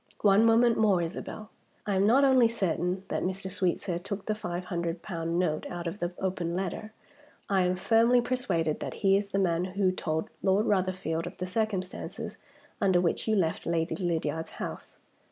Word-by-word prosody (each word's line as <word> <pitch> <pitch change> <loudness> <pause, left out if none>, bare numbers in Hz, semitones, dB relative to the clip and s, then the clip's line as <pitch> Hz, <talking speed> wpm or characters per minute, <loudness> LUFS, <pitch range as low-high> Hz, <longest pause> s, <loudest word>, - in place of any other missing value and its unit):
One 205 +2 +5
moment 230 +1 +4
more, 205 -4 +4
Isabel. 200 +5 -5 0.3
I 205 - 0
am 195 +1 +3
not 260 +5 +5
only 260 -3 +6
certain 185 -4 -1
that - - -1
Mr. 190 +1 -3
Sweetsir 180 -2 -1
took 200 +1 -5
the 215 - 0
five 180 -4 -4
hundred 170 -1 -3
pound 170 -3 -3
note 155 -4 0
out 175 0 -5
of 170 +5 -4
the 175 0 -2
open 180 -3 -2
letter, 195 +3 -3 0.6
I 195 -2 +2
am 180 +1 +1
firmly 230 +6 +4
persuaded 190 -11 0
that - - -5
he 195 0 +6
is 200 0 0
the 195 - -1
man 175 -3 +2
who 190 0 +1
told 160 -3 -3
Lord 195 +3 +3
Rotherfield 185 -4 0
of 175 - -9
the 185 - -3
circumstances 190 -1 -3 0.4
under 190 -3 +4
which 175 +4 0
you 220 - +3
left 165 -5 0
Lady 165 -1 0
Lydiard's 160 -3 -2
house. - - -7
185 Hz, 180 wpm, -29 LUFS, 175-205 Hz, 0.6 s, only